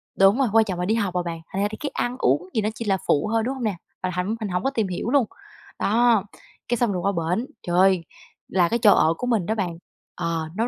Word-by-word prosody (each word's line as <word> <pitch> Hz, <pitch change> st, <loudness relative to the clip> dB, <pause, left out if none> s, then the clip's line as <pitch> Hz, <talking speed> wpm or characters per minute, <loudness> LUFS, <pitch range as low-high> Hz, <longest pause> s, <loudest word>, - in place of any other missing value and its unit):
Đúng 195 Hz, +5 st, +5 dB
rồi, 270 Hz, -, +3 dB
quan 225 Hz, -1 st, +5 dB
trọng 185 Hz, -4 st, -4 dB
là 180 Hz, -, 0 dB
đi 220 Hz, +3 st, +1 dB
học 200 Hz, -5 st, -1 dB
mà 180 Hz, -, +2 dB
bạn, 165 Hz, -1 st, -5 dB
thành 195 Hz, -, -1 dB
ra 205 Hz, -, +2 dB
thì 215 Hz, -, -6 dB
cái 290 Hz, -, -3 dB
ăn 245 Hz, +1 st, -1 dB
uống 145 Hz, +9 st, +1 dB
thì 220 Hz, -, +2 dB
nó 210 Hz, -, 0 dB
chỉ 230 Hz, -, -5 dB
là 195 Hz, -2 st, +2 dB
phụ 145 Hz, +8 st, +2 dB
thôi, 225 Hz, -1 st, +2 dB
đúng 260 Hz, +4 st, -1 dB
hông 255 Hz, -, -6 dB
nè? 210 Hz, -4 st, 0 dB, 0.3 s
Mà 185 Hz, -, 0 dB
thậm 185 Hz, +5 st, -1 dB
mình 215 Hz, -3 st, -3 dB
hổng 180 Hz, 0 st, -1 dB
có -, -, +2 dB
tìm 225 Hz, -7 st, -1 dB
hiểu 185 Hz, +5 st, -3 dB
luôn. 275 Hz, -3 st, +4 dB, 0.5 s
Đó, 230 Hz, -1 st, +3 dB, 0.4 s
cái 240 Hz, -, 0 dB
xong 235 Hz, -3 st, +1 dB
rồi 180 Hz, -, -2 dB
qua 200 Hz, -, +1 dB, 0.3 s
bển, 240 Hz, -, -2 dB, 0.2 s
trời 175 Hz, 0 st, 0 dB
ơi, 185 Hz, -2 st, +4 dB, 0.4 s
là 175 Hz, -2 st, +2 dB
cái 235 Hz, -, 0 dB
chỗ 215 Hz, -3 st, +6 dB
ở 160 Hz, -, +3 dB
của 250 Hz, -, -3 dB
mình 220 Hz, -8 st, +1 dB
đó 220 Hz, -, -1 dB
bạn, 175 Hz, -5 st, -2 dB, 0.4 s
ờ, 165 Hz, -2 st, -2 dB
nó 230 Hz, +3 st, 0 dB
200 Hz, 280 wpm, -24 LUFS, 180-230 Hz, 0.5 s, chỗ